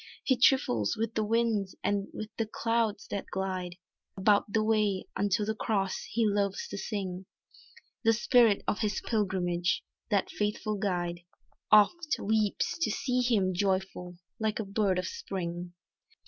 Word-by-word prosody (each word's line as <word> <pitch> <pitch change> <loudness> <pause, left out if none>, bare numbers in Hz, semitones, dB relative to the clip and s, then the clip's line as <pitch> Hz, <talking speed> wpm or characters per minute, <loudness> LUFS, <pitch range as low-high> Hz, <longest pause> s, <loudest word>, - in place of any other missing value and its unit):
He 260 - +3
trifles 120 - +3
with 225 +1 -2
the 220 - 0
winds 220 -3 0
and 200 -1 0
with 215 - -6
the 225 - -1
clouds 225 -2 0
that 200 - -3
glide, 185 -2 -3 0.4
About 200 +1 +3
the 215 +1 +2
way 215 -3 +1
unto 205 +1 +1
the 220 - 0
Cross, 200 -3 -1
he 230 +1 +1
loves 200 -2 0
to - - -5
sing, 190 -4 -4 0.8
The 225 -1 +5
spirit 230 -2 +4
on - - +1
his 210 -2 -1
pilgrimage; 180 -5 0 0.3
that 205 -3 +1
faithful 210 0 -2
guide, 175 -4 -1 0.5
Oft 305 - +5
weeps 215 +6 0
to 335 - +1
see 250 -2 0
him 210 -7 +2
joyful 185 -1 -1 0.2
like 220 -1 0
a 220 - -2
bird 195 -2 +1
of 185 - -1
Spring. 175 -1 -5
205 Hz, 145 wpm, -30 LUFS, 190-220 Hz, 0.8 s, The